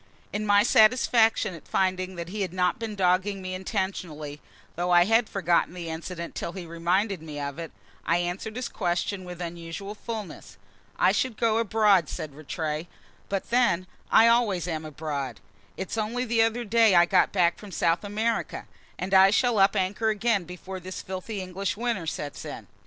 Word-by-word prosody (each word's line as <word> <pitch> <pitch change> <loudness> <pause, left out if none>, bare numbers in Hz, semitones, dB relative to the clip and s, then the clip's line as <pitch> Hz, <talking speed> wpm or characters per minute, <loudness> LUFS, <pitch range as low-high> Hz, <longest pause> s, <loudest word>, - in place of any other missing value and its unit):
In 210 +1 -2
my 205 0 +5
satisfaction 225 -3 +4
at 165 - -12
finding 185 0 0
that 170 0 -6
he 205 +2 -4
had 185 -3 -2
not 180 +1 +1
been 225 -2 -4
dogging 190 +1 +1
me 185 -1 -5
intentionally 175 -6 -4 0.3
(though 175 +1 -1
I 175 0 +6
had 225 +2 +3
forgotten 175 -2 +1
the 170 -2 -5
incident 170 +1 -6
till 170 - -4
he 185 -3 -7
reminded 175 +3 0
me 150 -2 -7
of 140 +2 -4
it), 165 -1 -6 0.3
I 170 - +2
answered 175 +5 -3
his 250 0 -3
question 185 +1 -2
with 180 -1 -8
unusual 170 +3 -6
fulness. 215 -2 -7 0.4
"I - - +4
should 255 -4 -1
go 225 -1 +2
abroad," 210 -7 +3
said 150 -2 -6
Rattray. 155 +2 -4 0.4
"But 195 +2 -3
then, 235 -7 +3 0.2
I 225 +1 +7
always 220 -7 +2
am 160 -2 -3
abroad; 140 - -4 0.4
it's 190 +4 -3
only 235 +4 -1
the 230 -1 +2
other 225 +2 +1
day 225 -2 +4
I 175 0 +7
got 185 0 +3
back 175 -3 +2
from 210 - -10
South 165 0 +1
America, 220 +3 -2 0.3
and 185 +2 -4
I 190 0 +8
shall 230 +1 +2
up 195 +2 +5
anchor 200 +3 0
again 215 -3 +1
before 185 +2 -8
this 185 +1 -7
filthy 190 +2 -5
English 185 +2 -3
winter 230 -7 -2
sets 145 -2 -5
in." - - -7
185 Hz, 180 wpm, -26 LUFS, 170-215 Hz, 0.4 s, I